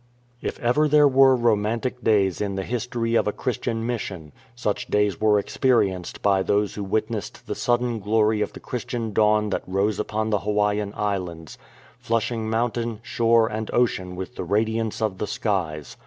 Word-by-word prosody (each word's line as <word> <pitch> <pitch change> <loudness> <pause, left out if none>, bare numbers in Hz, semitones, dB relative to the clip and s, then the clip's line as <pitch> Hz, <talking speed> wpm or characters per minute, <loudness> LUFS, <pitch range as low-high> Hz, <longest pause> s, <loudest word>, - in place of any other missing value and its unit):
If - - -4
ever 135 +6 +3
there 150 0 +6
were 135 -1 +6
romantic 115 +2 0
days 100 -4 +2
in 100 -2 -2
the 95 - -2
history 120 +1 -2
of 115 - +3
a - - +2
Christian 115 -1 -3
mission, 95 -10 -4 0.2
such 105 -4 -2
days 105 -4 +1
were 105 -1 +4
experienced 100 -5 0
by 100 -2 +3
those 105 +1 +1
who 105 - -5
witnessed 110 +2 -3
the - - -3
sudden 120 -1 0
glory 110 +1 +2
of - - -2
the - - -9
Christian 120 -3 -4
dawn 105 0 +3
that - - -1
rose 100 +2 0
upon 110 +1 -2
the 105 - +2
Hawaiian 105 0 0
Islands, 90 -6 -4 0.4
flushing 115 -1 -1
mountain, 115 0 -1
shore, 115 -1 +3
and 110 0 -4
ocean 95 -7 +1
with 95 +7 -7
the - - -3
radiance 110 +3 0
of 100 -4 -1
the 105 - -2
skies. 85 -8 -2
110 Hz, 170 wpm, -24 LUFS, 100-115 Hz, 0.4 s, there